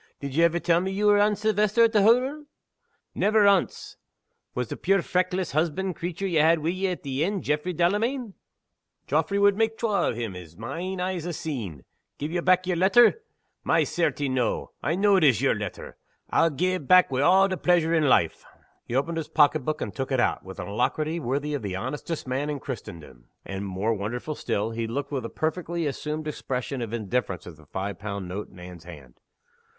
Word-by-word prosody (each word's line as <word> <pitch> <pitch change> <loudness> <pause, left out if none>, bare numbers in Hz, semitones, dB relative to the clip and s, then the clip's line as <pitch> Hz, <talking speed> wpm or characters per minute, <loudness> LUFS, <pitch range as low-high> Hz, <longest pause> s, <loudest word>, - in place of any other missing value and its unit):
Did 140 -1 -5
ye 165 - +4
ever 170 0 +3
tell 170 +1 +2
me 190 - -2
ye 200 +2 -2
were 205 0 +5
Anne 210 0 +3
Silvester, 215 +2 +2
at 230 - +4
the 210 - +5
hottle? 255 +8 +3 0.7
Never 215 0 +3
ance! 200 -2 +1 0.6
Was 125 -2 -2
the - - -4
puir 195 -1 +1
feckless 185 -1 -1
husband 170 +4 -1
creature 175 +3 -4
ye 175 -5 +1
had 160 +2 +5
wi' 160 +2 -1
ye 185 +2 -1
at 180 -2 -4
the 140 +1 -1
inn, 195 +2 -1
Jaffray 150 +5 -1
Delamayn? 210 - 0 0.7
Jaffray 200 - 0
wad 200 0 +5
mak' 225 0 +1
twa 215 -4 +1
o' - - 0
him, 115 -5 -4
as 85 -2 -11
my 120 +9 -5
ain 185 +1 -4
eyes 180 -2 -2
ha' 175 - -3
seen. 115 - -5 0.3
Gi' 145 - -4
ye 170 +3 -2
back 185 +1 +3
yer 180 -1 0
letter? 220 - +5 0.4
My - - +3
certie! 155 -4 -1
noo 130 -3 -1
I 160 - 0
know 200 +1 +4
it 185 - +2
is 130 -8 +5
yer - - +3
letter, - - -6 0.3
I'll 165 - +4
gi' 180 +5 0
it 155 -8 -4
back 185 -5 +6
wi' 130 0 0
a' 190 +6 +5
the 190 - -2
pleasure 170 -2 +2
in 155 -4 +3
life!" 85 -9 +2 0.4
He 120 - -3
opened 165 +5 0
his 160 - -4
pocket 150 -1 +3
book, 155 +3 -2
and - - -4
took 135 0 -4
it 130 - +1
out, - - +1
with 95 0 -10
an - - -5
alacrity 155 +10 -1
worthy 145 +2 -2
of 145 - -2
the 100 -3 -4
honestest 150 - -4
man 135 +3 -2
in 145 -2 -3
Christendom 80 - -8 0.2
and 95 +1 -5
(more 95 +4 -1
wonderful 115 +8 -4
still) 110 -6 -2
he 115 0 -3
looked 140 +5 -4
with 130 -5 -3
a - - -4
perfectly 170 +1 -2
assumed 150 +2 -3
expression 135 -2 -4
of 115 -2 -4
indifference 110 -4 -2
at 90 - -10
the 75 -1 -19
five 95 +3 -4
pound 100 -2 -5
note 100 +4 -5
in 95 - -17
Anne's 90 -2 -11
hand. 70 -8 -13
155 Hz, 210 wpm, -26 LUFS, 120-185 Hz, 0.7 s, back